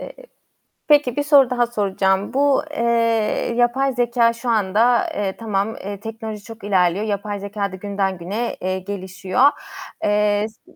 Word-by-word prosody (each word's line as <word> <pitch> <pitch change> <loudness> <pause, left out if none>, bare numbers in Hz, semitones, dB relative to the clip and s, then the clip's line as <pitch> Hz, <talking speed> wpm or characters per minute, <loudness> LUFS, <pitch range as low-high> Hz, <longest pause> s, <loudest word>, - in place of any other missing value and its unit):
Eee, - - -9 0.7
peki 290 -5 +4
bir 290 - 0
soru 285 -3 +5
daha 245 -1 +1
soracağım. 195 -2 0
Bu, 280 0 +3
eee, 230 -4 +1
yapay 260 +3 +2
zekâ 240 -1 +2
şu 235 +1 -5
anda, 225 +3 +2
eee, 195 -2 -2
tamam, 215 -1 -2
eee, 200 0 -7
teknoloji 220 -1 -7
çok 225 0 -12
ilerliyor. 190 0 +1
Yapay 205 0 -3
zekâ 200 0 -4
da 190 - -7
günden 195 -1 -2
güne, 200 +8 -3
eee, 185 +1 -1
gelişiyor. 190 +5 +1 0.5
Eee, 210 0 +2
s 220 - -27
215 Hz, 150 wpm, -21 LUFS, 200-240 Hz, 0.7 s, soru